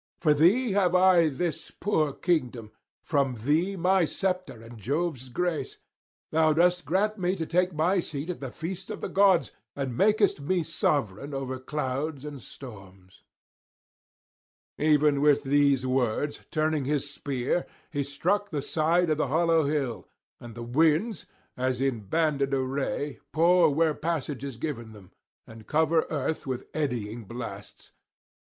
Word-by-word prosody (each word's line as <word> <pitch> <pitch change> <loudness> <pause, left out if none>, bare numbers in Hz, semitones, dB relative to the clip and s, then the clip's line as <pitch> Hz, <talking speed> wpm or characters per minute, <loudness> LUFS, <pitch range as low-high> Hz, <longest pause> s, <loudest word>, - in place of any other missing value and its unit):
From 150 -3 +3
thee 215 +9 +4
have 185 -2 +2
I 180 -3 +5
this 155 +3 -3
poor 155 -8 0
kingdom, 125 -10 -1 0.3
from 140 -4 +1
thee 155 - 0
my 185 0 +3
sceptre 185 - -3
and 115 0 -12
Jove's 140 - -2
grace; 175 +4 -2 0.5
thou 155 0 +4
dost 180 +1 +2
grant 200 +7 0
me 180 +1 +1
to 165 -3 -3
take 180 +3 +1
my 170 +4 +1
seat 155 0 -4
at 175 - -8
the 135 - -5
feasts 175 +7 -6
of - - -6
the - - -2
gods, 195 -3 +4 0.2
and 135 -4 -3
makest 210 - +3
me 175 +4 0
sovereign 140 -2 -1
over 130 -1 -4
clouds 140 +1 -3
and 145 -3 -7
storms.' 95 -8 -13 1.6
Even 150 -1 +3
with 145 -1 +4
these 140 -2 +3
words, 130 +2 0
turning 155 -2 0
his 145 0 -1
spear, 140 +2 -2 0.2
he 145 -3 -1
struck 185 +9 -1
the 145 -6 -3
side 165 +2 +1
of 155 - 0
the 145 - +1
hollow 165 +2 +3
hill, 140 -5 -2 0.3
and 120 -2 -10
the 120 - -6
winds, 160 - +1 0.3
as 130 -1 -1
in 135 -3 0
banded 140 +4 0
array, 135 +2 -2
pour 170 +1 +5
where 160 +2 +2
passage 150 -4 -3
is 135 -4 -6
given 120 -6 -5
them, 100 -4 -15 0.3
and 110 -1 -13
cover 160 +1 +2
earth 155 0 -2
with 130 -1 -3
eddying 120 -7 -3
blasts. 115 +4 -9
150 Hz, 150 wpm, -27 LUFS, 130-170 Hz, 1.6 s, I